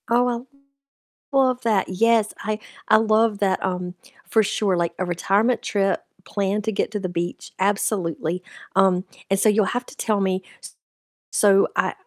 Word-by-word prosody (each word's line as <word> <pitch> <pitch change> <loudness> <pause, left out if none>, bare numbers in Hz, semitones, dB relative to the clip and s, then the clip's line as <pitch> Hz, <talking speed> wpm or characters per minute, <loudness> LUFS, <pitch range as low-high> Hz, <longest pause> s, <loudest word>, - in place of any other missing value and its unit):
Oh, 240 0 +1 0.9
I - - +3
love 255 -2 +3
that, 215 -5 +1
yes, 220 +3 +2
I 215 +1 -2 0.3
I 215 - +6
love 220 -1 +2
that, 190 -2 +1
um, 180 -1 -3 0.3
for 220 - +4
sure, 195 -2 0
like 170 -1 0
a 185 - 0
retirement 195 +7 +1
trip 195 -1 0 0.2
planned 200 +1 -1
to 220 - 0
get 215 - -1
to 210 - -2
the 185 -2 -3
beach, 175 0 -4
absolutely, 185 -3 -1 0.3
um, 190 -1 +3 0.2
and 195 0 +2
so 215 - +4
you'll 210 -1 +3
have 245 +5 -2
to - - -13
tell 210 -3 0
me, 190 -1 0 0.2
s - - -11 0.6
so 195 -1 +4
I - - +1
200 Hz, 170 wpm, -23 LUFS, 185-220 Hz, 0.9 s, I